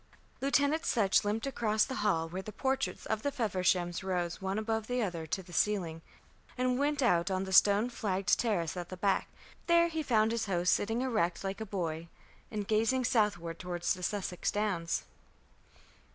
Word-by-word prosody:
Lieutenant 285 +3 +2
Sutch 205 - +3
limped 210 +3 -1
across 220 -5 +1
the 260 - -5
hall, 165 -6 +1
where 180 +3 -5
the 215 - -8
portraits 265 +3 -2
of 220 -1 -1
the 285 - -1
Fevershams 185 -7 0
rose 180 -2 -2
one 190 +1 -2
above 220 0 -2
the 245 -1 0
other 170 -5 -4
to 190 +4 -3
the 175 0 -14
ceiling, 170 -4 0 0.6
and 255 0 +1
went 290 0 +1
out 175 -7 +3
on 190 -1 0
to - - -3
the 190 - -5
stone 205 +4 +6
flagged 195 -6 0
terrace 190 -9 0
at 175 -1 -5
the 185 - -7
back. 195 +1 +1 0.4
There 340 0 +5
he 320 -1 -2
found 225 -6 +2
his 230 -2 -1
host 180 -2 +2
sitting 225 +4 0
erect 215 -10 0
like 195 +2 -4
a 220 - -4
boy, 170 -4 -3 0.4
and 210 -3 -4
gazing 225 +4 +2
southward 175 -8 0
toward 175 -1 -5
the 180 - 0
Sussex 185 -1 -2
Downs. 195 -6 -1
205 Hz, 180 wpm, -31 LUFS, 180-230 Hz, 0.6 s, stone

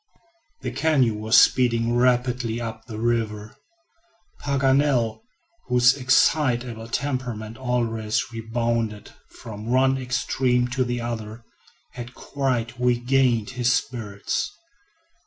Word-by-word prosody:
The 125 -3 -4
canoe 135 -3 +2
was 110 +3 +2
speeding 115 -2 +3
rapidly 125 -1 +1
up 110 -1 -6
the 110 - -7
river. 110 -2 -2 0.8
Paganel, 135 - +1 0.5
whose 125 0 +4
excitable 125 -3 +1
temperament 120 -4 -3
always 115 -4 -1
rebounded 115 -1 -2 0.2
from 105 -1 -9
one 130 +2 +2
extreme 125 -1 0
to 130 +1 0
the 120 -1 -3
other, 115 -1 -5 0.5
had 120 0 -9
quite 125 -4 -2
regained 125 -2 +2
his 125 -1 +1
spirits. 115 - -2
120 Hz, 100 wpm, -24 LUFS, 115-130 Hz, 0.8 s, whose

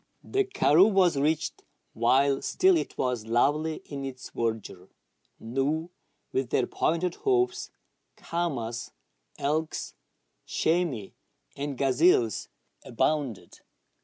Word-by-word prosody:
The 400 0 0
karroo 215 - +4
was 185 -5 +4
reached 150 +3 0 0.3
while 135 +4 +3
still 375 0 +3
it 330 - -2
was 125 -4 -1
lovely 150 +7 +1
in 140 -2 -6
its 130 -1 -7
verdure. 110 -5 -3 0.5
Gnus, 140 +8 -1 0.4
with 130 -2 -1
their - - +2
pointed 170 +2 0
hoofs, 375 -2 +1 0.5
caamas, 130 -9 -3 0.5
elks, 155 +3 -2 0.5
chamois, 160 - 0 0.4
and 140 -1 -4
gazelles 130 - +3 0.3
abounded. 130 -1 -1
145 Hz, 100 wpm, -27 LUFS, 125-170 Hz, 0.5 s, karroo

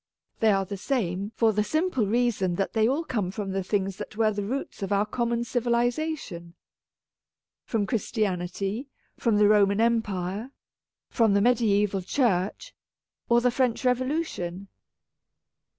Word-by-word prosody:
They 220 -4 +4
are 195 -1 +1
the 200 +1 -6
same, 200 -4 -2
for 225 -1 +3
the 210 +1 +1
simple 310 - 0
reason 215 -5 +1
that 195 - -2
they 220 -1 +3
all 280 +7 0
come 215 - -2
from 195 0 -4
the 195 0 -1
things 195 0 -1
that 215 - -8
were 220 -1 +3
the 205 -1 -3
roots 255 +2 -4
of 195 - -3
our 200 +1 +2
common 235 +2 -1
civilization. 240 - -1 1.1
From 220 -3 0
Christianity, 200 +1 -2 0.3
from 230 -4 +1
the 210 0 +5
Roman 205 -1 +4
Empire, 220 -2 0 0.6
from 225 -4 +3
the 200 - +4
mediaeval 210 -4 +2
Church, 210 - 0 0.6
or 235 0 +5
the 250 0 +3
French 250 -1 0
Revo 250 0 +2
lution. 200 - -3
215 Hz, 145 wpm, -26 LUFS, 195-240 Hz, 1.1 s, the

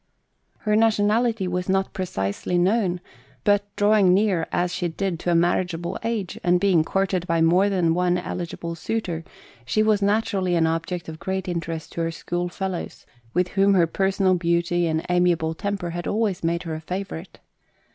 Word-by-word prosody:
Her 210 -1 +1
nationality 220 -1 +2
was 180 +1 -2
not 190 0 +1
precisely 175 - -2
known; 185 -1 +1 0.4
but 205 0 +2
drawing 205 -3 +4
near, 195 -5 +1
as 175 0 0
she 180 - -1
did, 175 0 -3
to 175 - -2
a - - +3
marriageable 175 0 0
age, 225 -6 -3
and 175 0 +3
being 185 -5 +3
courted 185 0 -1
by 165 0 +1
more 175 +5 +4
than 175 -4 +2
one 180 +1 +2
eligible 170 -1 -5
suitor, 170 -1 -3 0.4
she 215 - +1
was 215 -1 +2
naturally 200 -3 +1
an 165 -1 +3
object 165 +2 -2
of 160 -1 -8
great 190 0 -3
interest 165 -2 -4
to 170 - -4
her 165 - 0
schoolfellows, 175 +2 -4 0.3
with 180 0 +2
whom 195 0 +3
her 175 -3 +5
personal 190 +2 +1
beauty 170 0 +1
and 160 0 -1
amiable 175 -2 +2
temper 195 -1 -3
had 175 +1 -4
always 205 -4 0
made 170 +1 0
her 165 -2 -4
a 155 - -5
favourite. 185 0 -6
180 Hz, 165 wpm, -24 LUFS, 170-195 Hz, 0.4 s, her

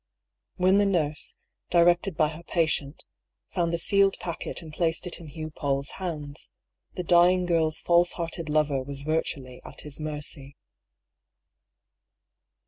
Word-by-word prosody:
When 185 +2 +4
the 205 - +4
nurse, 155 -6 -1 0.3
directed 175 +1 +3
by 155 -1 +3
her 160 +2 -9
patient, 160 -4 -1 0.5
found 170 -2 0
the 170 - 0
sealed 195 +3 +3
packet 170 0 -4
and 155 -2 -10
placed 165 +1 0
it 180 - -5
in 165 - -10
Hugh 155 +1 -7
Paull's 140 -2 -2
hands, 150 -5 -5 0.5
the 180 - -3
dying 180 +1 +5
girl's 160 -2 +1
false 175 0 +4
hearted 170 -2 -4
lover 150 -3 +2
was 140 +1 -4
virtually 140 -5 -2
at - - -10
his 150 0 -7
mercy. 145 -2 -4
160 Hz, 135 wpm, -27 LUFS, 150-175 Hz, 0.5 s, dying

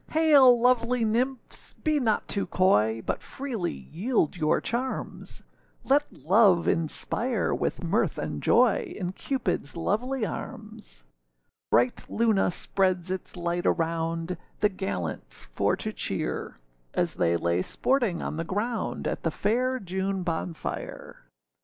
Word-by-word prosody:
Hail! 285 -6 +6
lovely 245 -1 +3
nymphs, 245 +4 -2
be 310 -2 0
not 225 -5 +1
too 200 - -2
coy, 115 - +2
But - - -2
freely 245 -10 -4
yield 165 - -1
your 155 -3 +2
charms; 255 +3 -4 0.4
Let 285 +2 +3
love 190 -1 +4
inspire 220 +9 0
with - - -2
mirth - - +1
and - - -4
joy, 400 -8 +3
In 180 -2 -3
Cupidâs 225 - -2
lovely 225 +8 0
arms. 215 - -8 0.7
Bright 120 +1 +2
Luna 220 -3 +2
spreads 185 0 0
its 185 0 -5
light 175 0 -1
around, 165 +1 -1 0.2
The 210 - +4
gallants 95 - -5
for - - 0
to - - -4
cheer; - - -3 0.4
As - - +1
they 85 0 +2
lay 85 +1 +1
sporting 235 - 0
on - - -3
the 165 - -1
ground, 215 +7 -2
At - - -2
the 165 - 0
fair 250 +9 0
June 190 0 -2
bonfire. 165 -1 -5
195 Hz, 130 wpm, -27 LUFS, 165-245 Hz, 0.7 s, Hail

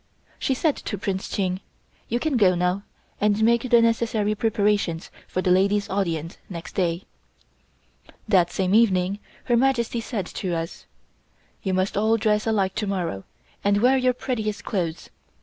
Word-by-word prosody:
She 265 - 0
said 300 +2 +1
to 205 - -4
Prince 190 0 -3
Ching: 185 -2 -1 0.5
"You 240 - 0
can 310 +1 0
go 190 -6 +4
now, 180 +2 0 0.4
and 210 +1 +2
make 235 +2 +3
the 235 -1 +6
necessary 225 -2 +1
preparations 205 -6 0 0.2
for 185 - -2
the 180 - +2
ladies' 200 +2 +2
audience 170 -4 -2
next 175 -1 -7
day." 175 -1 0 1.2
That 185 -5 +4
same 190 0 0
evening 200 -3 +3 0.2
Her 240 - +2
Majesty 235 -2 +1
said 220 -5 -3
to 180 -1 -3
us: 165 0 -5 0.7
"You 190 -2 -1
must 185 +2 0
all 220 +2 +3
dress 210 0 +1
alike 195 -4 +1
to 210 -1 -1
morrow, 175 - -2 0.4
and 205 0 +3
wear 250 +4 +5
your 255 -1 +3
prettiest 220 -5 -3
clothes. 175 -6 -3
205 Hz, 155 wpm, -24 LUFS, 185-230 Hz, 1.2 s, the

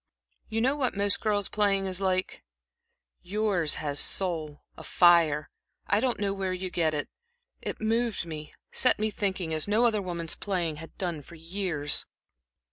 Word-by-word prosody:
"You 225 +1 -1
know 265 +4 +2
what 260 -7 0
most 200 0 +1
girls' 205 -3 +1
playing 200 -2 +1
is 190 0 -2
like. 185 -1 -1 0.8
Yours 190 -5 0
has 145 -1 -1
a - - +4
soul, 160 -6 -2
a - - -10
fire 165 -4 +4 0.3
I 205 - +2
don't 250 0 0
know 200 -1 0
where 190 -1 -2
you 185 0 -4
get 160 -3 +1
it. 145 - -2 0.5
It - - -4
moved 225 -2 0
me, 155 -2 -7 0.2
set 255 - +4
me 215 +1 0
thinking, 190 -5 -2
as 155 +3 -1
no 215 +4 +3
other 215 -3 +2
woman's 170 -3 -2
playing 175 -6 -2
has 165 +1 -9
done 175 -5 -2
for 170 - -13
years." 165 -3 0
185 Hz, 170 wpm, -28 LUFS, 165-205 Hz, 0.8 s, a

